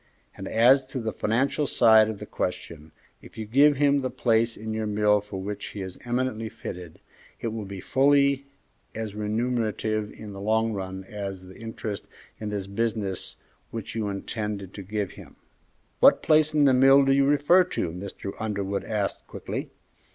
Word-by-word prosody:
And 95 - -7
as 125 +4 +5
to 130 0 -5
the 110 -2 -2
financial 135 +9 0
side 110 -3 +5
of 110 - -4
the - - -8
question, 80 -1 -5 0.3
if - - -15
you 110 - -4
give 140 +7 +5
him 140 0 +3
the 130 - -2
place 115 -2 +1
in 110 +1 -5
your 110 0 -2
mill 105 0 +3
for 105 -2 -7
which 100 +1 -5
he 100 - -6
is 95 -1 -8
eminently 120 -2 -1
fitted, 90 -7 -8 0.4
it 115 - -2
will 110 -1 -5
be 100 0 -7
fully 140 +4 +3 0.5
as 110 -2 -4
remunerative 110 0 -1
in 105 -2 -10
the 100 - -8
long 110 +2 +1
run 95 -1 -5
as 100 -2 -6
the 95 0 -13
interest 110 -3 -6 0.3
in 105 - -4
the 100 -2 -4
business 105 -2 -2 0.3
which 115 -2 -6
you 110 -2 -2
intended 100 -1 -4 0.2
giving 105 -3 -2
him." - - -13 0.6
"What - - +6
place 155 0 +4
in 150 -1 +5
the 135 - +5
mill 135 +2 +6
do 135 - +3
you 135 0 +4
refer 145 +6 +5
to?" 90 - -3
Mr. 100 +2 -7
Underwood 100 -2 -2
asked, 105 -2 -3
quickly. - - -5
110 Hz, 175 wpm, -26 LUFS, 100-125 Hz, 0.6 s, What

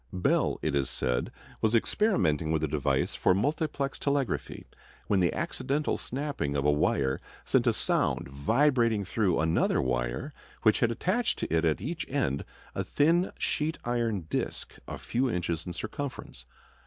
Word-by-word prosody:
Bell, 90 -1 +1
it - - 0
is 70 -2 +1
said, 60 -1 -1 0.3
was 110 +1 +3
experimenting 90 - +2
with 80 -1 +1
a - - +2
device 75 -1 0
for 90 - +3
multiplex 140 - -1
telegraphy, 140 -6 -1 0.4
when 100 - +2
the 85 -2 +3
accidental 145 +2 -1
snapping 130 - -2
of 70 - -1
a 75 - +5
wire 70 -2 +1 0.2
sent - - +2
a - - +5
sound - - 0
vibrating 115 - +2
through 95 -2 +1
another 80 +1 +2
wire 60 - -1 0.3
which 110 -2 +4
had 120 - +3
attached 190 - 0
to - - -3
it 80 +1 +2
at 80 +1 +1
each 160 - -4
end 130 - 0 0.3
a - - -2
thin 170 +5 +2
sheet 155 +2 -1
iron 120 -4 0
disk 80 - -3
a - - -5
few 125 +2 0
inches 85 -4 -2
in 90 - -4
circumference. 110 - -6
105 Hz, 155 wpm, -29 LUFS, -, 0.4 s, a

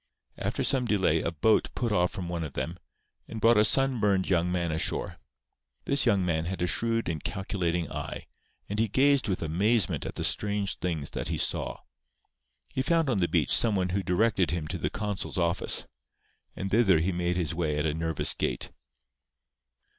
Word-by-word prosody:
After - - -2
some 130 -3 +2
delay 95 -8 +2
a - - -1
boat 85 +7 +2
put 120 -3 -1
off 90 -3 +2
from 95 -4 -5
one 85 -1 -3
of 75 - -6
them, 85 +6 -4 0.5
and 115 - -6
brought 115 0 +5
a - - +6
sunburned 110 -7 +2
young 90 -1 +1
man 85 -2 -1
ashore. 80 - -2 0.7
This 140 -2 +2
young 100 -5 +3
man 80 -2 0
had 90 0 -3
a - - +3
shrewd 115 +5 0
and 80 -3 -3
calculating 95 -6 -2
eye; - - -6 0.4
and 105 +1 -3
he 110 - +2
gazed 140 +5 +3
with 95 -3 -1
amazement 100 +6 +1
at - - -7
the - - -4
strange 100 -1 0
things 80 -5 -3
that - - -4
he - - -2
saw. - - -2 0.9
He 130 - -2
found 165 -1 +2
on 105 - +1
the 85 - +2
beach - - +1
some 110 -3 +5
one 90 -1 0
who 95 +2 0
directed 95 0 +1
him 85 -3 -2
to - - -4
the - - -1
consul's 105 -3 -3
office; 85 0 0 0.7
and 95 0 -4
thither 105 -6 +4
he 85 +5 0
made 90 0 -1
his 80 -3 -1
way 80 -3 -1
at 75 - 0
a 75 - 0
nervous 80 -1 +1
gait. - - -2
95 Hz, 190 wpm, -28 LUFS, 85-110 Hz, 0.9 s, a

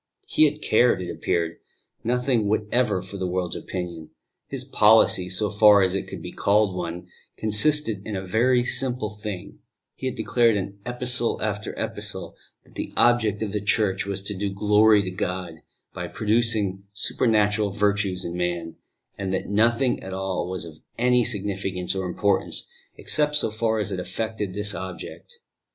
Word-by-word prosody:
He 155 - +4
had 150 +1 -1
cared, 120 0 +3
it 90 -1 -4
appeared, 85 -1 -1 0.5
nothing 125 -2 +1
whatever 105 -1 +1
for 95 +2 -9
the 95 -1 -2
world's 90 -1 -2
opinion; 85 -3 -6 0.4
his - - -5
policy, 90 0 +4
so 100 +3 0
far 105 -1 +6
as 95 -1 +1
it 95 - -2
could - - -8
be - - -6
called 100 -1 +2
one, 90 -1 -5 0.3
consisted 110 0 +3
in 105 - -5
a 95 0 -4
very 120 +6 +2
simple 125 -4 0
thing: 105 -3 -7 0.3
he 130 - -5
had 130 - -3
declared 115 +1 +2
in 100 0 -4
Epistle 125 -1 +1
after 105 -1 -3
Epistle - - -3 0.3
that - - -23
the - - -5
object 110 -3 +3
of 105 - -3
the 105 0 -2
Church 100 -2 0
was 100 0 -2
to 105 - -2
do 100 +1 -2
glory 105 +1 +4
to 95 - -4
God 90 -3 -4 0.3
by - - -5
producing 110 -3 +1
supernatural 105 -1 +1
virtues 100 -2 0
in 85 - -4
man, 85 -2 -3 0.4
and 95 -1 -2
that 95 - -2
nothing 115 +5 +2
at 95 0 -6
all 95 -2 -2
was 95 -2 -3
of 80 -2 -12 0.2
any 125 0 +3
significance 100 -4 -2
or 95 -1 -3
importance 100 +3 0 0.3
except 150 -1 0
so 150 - +3
far 110 0 0
as 105 -2 -2
it 95 - -3
effected 105 0 -4
this 105 0 +1
object. 95 - -8
105 Hz, 165 wpm, -24 LUFS, 95-115 Hz, 0.5 s, far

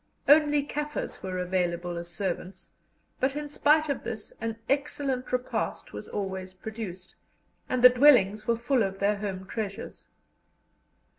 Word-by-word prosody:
Only 295 0 +5
Kaffirs 295 +1 -4
were 185 -1 -4
available 175 -1 -1
as 170 0 -5
servants, 180 +1 -4 0.5
but, 265 +2 +1
in 295 0 -3
spite 300 +1 +3
of 280 - -2
this, 225 -3 -6
an 225 0 -3
excellent 275 -2 -1
repast 250 0 -2
was - - -7
always 190 -2 -4
produced, 190 -3 -7 0.5
and 255 -1 0
the 250 - +12
dwellings 245 -6 +5
were 235 - +3
full 245 +2 +1
of 195 -2 -1
their 200 +1 +1
home 195 -2 -4
treasures. 200 0 -6
220 Hz, 140 wpm, -28 LUFS, 190-275 Hz, 0.5 s, the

